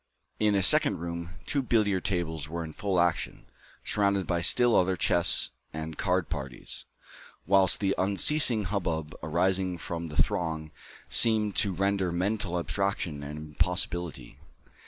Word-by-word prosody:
In 105 -1 +2
a 95 - +1
second - - +5
room, 85 +1 -6
two 140 - -1
billiard 105 -7 0
tables 80 -5 -3
were 85 +1 -4
in 80 -1 -9
full 95 0 -1
action, 85 -1 -1 0.4
surrounded 100 -2 0
by 85 -1 -1
still 120 +8 +4
other 95 0 +2
chess 85 0 +3 0.2
and 80 0 -6
card 90 -1 -1
parties, 65 -5 -6 0.6
whilst 95 0 +3
the 100 -1 0
unceasing 110 +4 +4
hubbub 85 -6 -3
arising 90 +3 0
from 85 0 -6
the 75 -2 -4
throng 80 +1 -1 0.4
seemed 110 -3 +5
to 100 - +1
render 95 0 -1
mental 95 0 -2
abstraction 85 -4 -2
an 75 +1 -7
impossibility. 75 -1 -4
90 Hz, 135 wpm, -27 LUFS, 80-100 Hz, 0.6 s, second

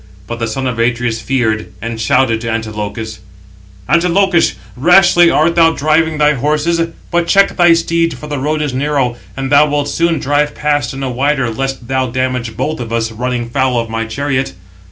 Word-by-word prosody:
But 120 +3 -6
the 115 - -1
son 130 +4 -3
of 125 -3 -2
Atreus 120 -1 0
feared, 110 -3 -1
and 115 +1 -5
shouted 115 0 +2
to 115 - -4
Antilochus: 110 0 -4 0.7
"Antilochus, 180 +1 +2 0.2
rashly 175 +4 +5
art 165 +2 +2
thou 165 -1 +4
driving 155 +1 +1
thy 150 0 +3
horses; 150 +5 0 0.3
but 170 0 +1
check 195 +2 +3
thy 175 -2 +5
steeds 165 0 0
for - - -10
the 145 -2 -4
road 150 +3 -1
is 145 -3 -3
narrow, 135 -2 0 0.2
and 135 0 -3
thou 145 +1 +6
wilt 145 -1 -1
soon 165 +2 +1
drive 145 +2 0
past 145 -4 0
in 135 - -5
a 130 - -2
wider 135 -1 0
lest 135 0 -4
thou 130 0 0
damage 125 -2 -3
both 155 +1 -2
[of 115 -2 -6
us], 115 -1 -1
running 120 +1 -3
foul 130 -1 +1
of 115 -1 -4
[my] 115 0 -2
chariot." 135 +3 -2
135 Hz, 185 wpm, -15 LUFS, 115-155 Hz, 0.7 s, thou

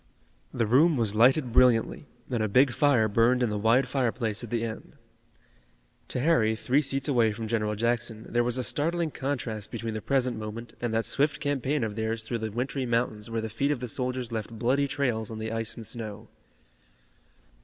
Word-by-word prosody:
The 120 -2 0
room 145 +8 +4
was 110 -4 0
lighted 125 +4 +4
brilliantly, 125 +3 +3 0.2
and 120 -3 0
a 110 - +1
big 125 +6 +4
fire 125 -5 +3
burned 115 +4 +3
in 115 - 0
the 105 - -1
wide 115 +5 +3
fireplace 120 -4 -1
at 120 - -7
the 115 0 -1
end. 110 -1 -6 1.1
To - - -3
Harry, 125 -7 +3
three 130 +6 +1
seats 135 -2 -1
away 120 -6 +3
from 110 +1 -5
General 105 -1 -1
Jackson, 115 0 -1
there 120 0 +1
was 120 +1 -1
a 130 - -1
startling 165 +6 0
contrast 125 -7 -4
between 115 -1 -4
the 110 - -4
present 125 -3 0
moment 110 +2 -7
and 120 -1 -1
that 115 0 0
swift 145 +1 +1
campaign 145 -1 -1
of 105 -2 -3
theirs 110 0 -2
through 115 +1 -3
the 110 0 -3
wintry 130 +3 -2
mountains 115 -2 -1
where 115 0 -2
the 110 - -3
feet 115 +6 -1
of 145 -4 0
the 125 - -4
soldiers 125 0 -3
left 110 -2 -3
bloody 125 +5 0
trails 120 -6 -1
on 110 - -6
the 110 0 -4
ice 115 -1 -2
and 115 - -8
snow. 110 -1 -7
120 Hz, 195 wpm, -27 LUFS, 110-130 Hz, 1.1 s, room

